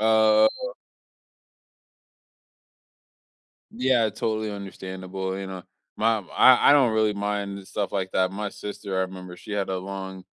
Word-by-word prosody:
Oh. 110 - +4 3.0
Yeah, 130 - +2
totally 110 +1 -2
understandable, 95 -1 -6
you 95 - -5
know 95 -1 -7 0.3
my 110 0 +2
I 125 +8 +5
I - - +9
don't 135 -6 +5
really 110 -1 +2
mind 100 -1 -3
stuff 100 - -3
like 95 -1 -2
that. 95 0 +2
My 105 +1 -4
sister, 100 -1 -6
I - - +2
remember, 90 -1 -7
she 105 +4 -9
had 100 -2 -1
a 95 -1 -1
long 95 0 -7
100 Hz, 135 wpm, -25 LUFS, 95-110 Hz, 3.0 s, I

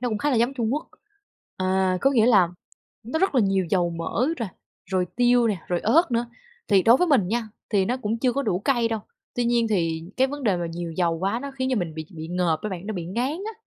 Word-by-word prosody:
nó 250 - -1
cũng 215 -2 -2
khá 295 - 0
là 255 - +2
giống 240 +4 +2
Trung 235 -1 0
Quốc. 300 - -4 0.7
Ờ, 185 0 +1
có 275 - +4
nghĩa 230 -5 +4
là 200 -8 +5 0.5
nó 245 +8 -3
rất 385 -3 +1
là 255 - +5
nhiều 195 -3 +1
dầu 175 -3 +2
mỡ 170 +9 -1
rồi, 230 -4 -2 0.4
rồi 185 -1 +1
tiêu 245 0 +4
nè, 200 -5 -1
rồi 175 -1 0
ớt 310 +9 +3
nữa. 235 0 0 0.4
Thì 195 -3 +5
đối 230 +4 +6
với 360 - +2
mình 255 - +3
nha, 230 0 -1 0.2
thì 200 -3 +3
nó 245 +5 -1
cũng 225 -2 -2
chưa 250 +1 +1
có 280 +3 -1
đủ 195 -8 0
cay 240 0 +1
đâu, 225 -1 -2 0.3
tuy 245 - 0
nhiên 235 -1 +2
thì 165 -6 0
cái 260 - +4
vấn 290 +1 -6
đề 205 -7 +2
mà 175 - -2
nhiều 170 0 -5
dầu 165 -1 0
quá 195 +6 0
nó 280 - -5
khiến 260 -1 -3
cho - - +1
mình 165 -3 -3
bị 155 -1 -6
bị 160 0 -7
ngợp 175 -3 0
á 215 - -2
bạn, 190 -1 -6
nó 220 - -3
bị 175 -3 -4
ngán 235 +8 -1
á, 390 +8 -5
220 Hz, 265 wpm, -24 LUFS, 180-250 Hz, 0.7 s, đối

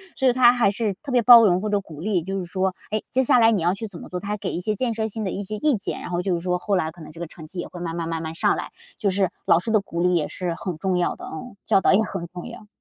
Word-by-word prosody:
所 265 -2 +3
以 - - +5
他 245 -1 +6
还 235 -5 +3
是 210 -1 -1
特 280 - -6
别 245 -2 +4
包 235 -1 +9
容 180 -2 +3
或 215 - -2
者 205 -1 +1
鼓 155 -5 -12
励， 185 -1 0
就 195 +2 -3
是 180 - -4
说， 185 +1 -1 0.2
哎， 215 0 -1
接 260 - +2
下 250 - +4
来 225 -1 +6
你 205 - +1
要 175 +2 +2
去 220 +3 -5
怎 175 - -10
么 - - -10
做， 180 - -5
他 205 - -7
还 210 - -1
给 - - -4
一 175 - -3
些 210 +3 -1
建 235 +1 -1
设 220 0 -2
性 215 +1 -4
的 185 - -2
一 205 - -4
些 215 +2 -5
意 300 +3 +2
见。 200 - -4
然 - - -7
后 175 0 -1
就 190 -1 -1
是 170 - 0
说 180 +1 -1
后 195 +1 0
来， 160 -3 0
可 165 +1 -13
能 155 - -10
这 165 - -13
个 170 - -4
成 160 -1 -12
绩 175 +3 -8
也 - - -4
会 175 - -10
慢 170 -1 -4
慢 165 -1 -3
慢 165 0 -3
慢 160 - -5
上 165 - +2
来。 - - -6 0.3
就 205 - +1
是 190 -1 +1 0.2
老 165 - +5
师 225 - -5
的 215 -2 +3
鼓 170 -3 -4
励 180 0 +3
也 155 - +1
是 180 -2 -3
很 180 -4 -4
重 185 +1 0
要 175 - 0
的， - - -10
嗯， 200 +8 -8
教 195 - +3
导 - - +4
也 215 - +4
很 180 -5 -5
重 175 0 -8
要。 210 - -11
190 Hz, 375 characters per minute, -23 LUFS, 175-215 Hz, 0.3 s, 包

